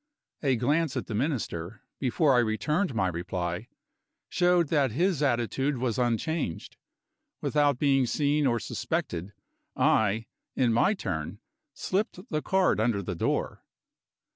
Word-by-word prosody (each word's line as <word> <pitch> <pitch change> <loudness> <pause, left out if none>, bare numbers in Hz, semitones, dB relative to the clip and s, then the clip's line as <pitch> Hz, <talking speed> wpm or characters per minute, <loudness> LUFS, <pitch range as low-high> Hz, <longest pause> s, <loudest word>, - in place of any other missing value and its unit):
A 135 -3 +2
glance 145 +5 +1
at - - -3
the 115 - -6
Minister, 110 - -3 0.2
before 140 +2 +2
I 125 - +5
returned 120 - 0
my 95 -4 +2
reply, 90 +3 -3 0.6
showed 175 -3 +3
that 145 -4 +2
his 170 - +1
attitude 135 +1 0
was 120 -1 -1
unchanged. 120 - -1 0.6
Without 145 -3 +2
being 135 -2 +3
seen 145 +2 +1
or 120 -2 +1
suspected, 90 -3 -3 0.4
I, 110 +1 +2 0.3
in 120 -3 +2
my 195 - +3
turn, 80 - -4 0.4
slipped 195 -1 -2
the 155 -1 0
card 190 - +2
under 110 -3 +1
the 90 - -3
door. 85 - -2
125 Hz, 130 wpm, -28 LUFS, 110-150 Hz, 0.6 s, I